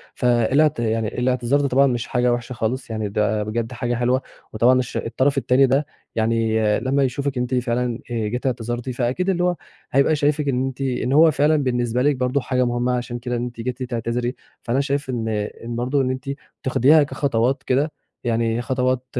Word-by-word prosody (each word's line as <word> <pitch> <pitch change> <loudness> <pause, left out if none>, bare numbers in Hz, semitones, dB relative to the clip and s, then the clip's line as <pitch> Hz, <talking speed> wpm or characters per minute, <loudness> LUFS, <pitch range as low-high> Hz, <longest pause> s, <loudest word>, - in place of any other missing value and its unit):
فالاعت 125 +4 +2
يعني 110 -1 0
الاعتذار 125 +4 +1
ده 140 - +1
طبعًا 135 +1 +4
مش 120 -2 -2
حاجة 125 -1 +2
وحشة 120 +1 -4
خالص 120 +3 -3
يعني 110 -2 -3
ده 105 +1 0
بجد 115 +2 -3
حاجة 120 0 -2
حلوة، 125 +2 +1 0.3
وطبعًا 125 +4 +4
الش 125 - -3
الطرف 135 +4 0
التاني 135 0 +4
ده 135 +4 +2 0.3
يعني 110 0 +1 0.2
لما 135 +1 +1
يشوفِك 135 +1 -2
أنتِ 125 +1 -1
فعلًا 120 -1 -1
آآ 115 -2 -1
جيتِ 125 +5 -4
اعتذرتِ 120 0 -2
فأكيد 130 +9 -1
اللي 180 -2 +1
هو 180 -1 +2 0.4
هيبقى 140 +4 +3
شايفِك 150 0 +1
إن 130 -1 +1
أنتِ 135 +1 -5
إن 130 -1 -1
هو 160 +2 +7
فعلًا 150 +2 +3
بالنسبة 120 -1 0
لِك 145 +2 +3
برضه 130 +2 0
حاجة 125 0 0
مهمة 120 +1 0
عشان 120 0 -4
كده 125 0 -3
إن 120 - -2
أنتِ 120 -1 -7
جيتِ 125 +1 -3
تعتذري، 120 +1 -2 0.3
فأنا 120 +3 0
شايف 140 -1 -2
إن 120 -3 -2 0.4
إن 120 0 -5
برضه 130 +4 0
إن 130 - 0
أنتِ 130 +1 -5 0.3
تاخديها 145 +3 +5
كخطوات 135 -2 0
كده 140 +4 +1 0.3
يعني 115 0 0
خطوات 130 +1 0
125 Hz, 190 wpm, -22 LUFS, 120-135 Hz, 0.4 s, هو